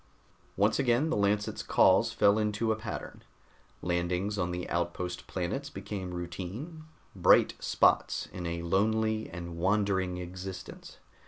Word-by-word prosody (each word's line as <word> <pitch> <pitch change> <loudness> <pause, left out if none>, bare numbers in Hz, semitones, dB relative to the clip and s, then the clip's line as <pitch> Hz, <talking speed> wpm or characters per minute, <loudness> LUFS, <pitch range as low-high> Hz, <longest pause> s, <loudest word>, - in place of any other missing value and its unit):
Once 100 +6 +3
again 130 +4 +2
the - - +1
Lancet's 105 0 0
calls - - +4
fell 100 +2 +4
into 105 +1 0
a - - +2
pattern. 110 0 -7 0.6
Landings 90 +3 0
on 90 -1 0
the 90 0 -4
outpost 85 +1 -3
planets 135 +11 -3
became 95 -5 -6
routine, 95 - -6 0.3
bright - - +5
spots - - +2
in 90 -2 -4
a 85 0 -3
lonely 110 +4 +1
and 85 0 -7
wandering 95 -1 +1
existence. 90 +1 -8
95 Hz, 130 wpm, -30 LUFS, 90-110 Hz, 0.6 s, bright